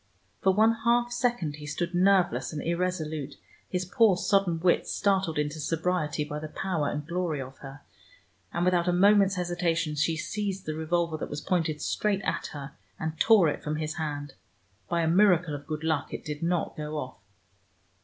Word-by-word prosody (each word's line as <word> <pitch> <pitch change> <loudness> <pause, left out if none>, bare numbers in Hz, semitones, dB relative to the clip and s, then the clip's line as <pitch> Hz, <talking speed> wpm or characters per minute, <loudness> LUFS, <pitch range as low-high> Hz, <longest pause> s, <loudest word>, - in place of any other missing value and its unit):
For 190 - +4
one 220 +4 +4
half 240 +1 +3
second 240 - -1
he 150 -1 -9
stood 170 +4 -3
nerveless 180 -9 +3
and 155 - -4
irresolute, 160 -5 -2 0.3
his 180 0 -1
poor 200 0 +4
sodden 195 -4 +2
wits 175 +1 +2
startled 190 -6 +1
into 150 +1 -1
sobriety 160 -1 -1
by 150 0 -5
the 155 - -6
power 165 -2 -2
and 150 0 -4
glory 170 -3 -2
of 135 0 -8
her, 135 +1 -10 0.7
and 170 +1 0
without 180 -1 +2
a 180 - +3
moment's 200 +1 +5
hesitation 175 -3 -1
she 155 +2 0
seized 195 +2 -3
the 155 - -2
revolver 160 +1 -1
that - - -5
was 145 0 -5
pointed 165 -4 -1
straight 205 -2 0
at - - -2
her, 140 -1 -8 0.3
and 160 0 -4
tore 215 -7 +6
it 150 - -2
from 150 0 -2
his 155 +1 -3
hand. 145 -3 -4 0.6
By 170 - +1
a - - +1
miracle 175 -3 +4
of 145 0 -7
good 155 0 -4
luck 160 -3 -1
it - - -6
did 150 -1 -5
not 170 0 -1
go 150 0 -4
off. 130 -6 -6
165 Hz, 185 wpm, -28 LUFS, 150-185 Hz, 0.7 s, tore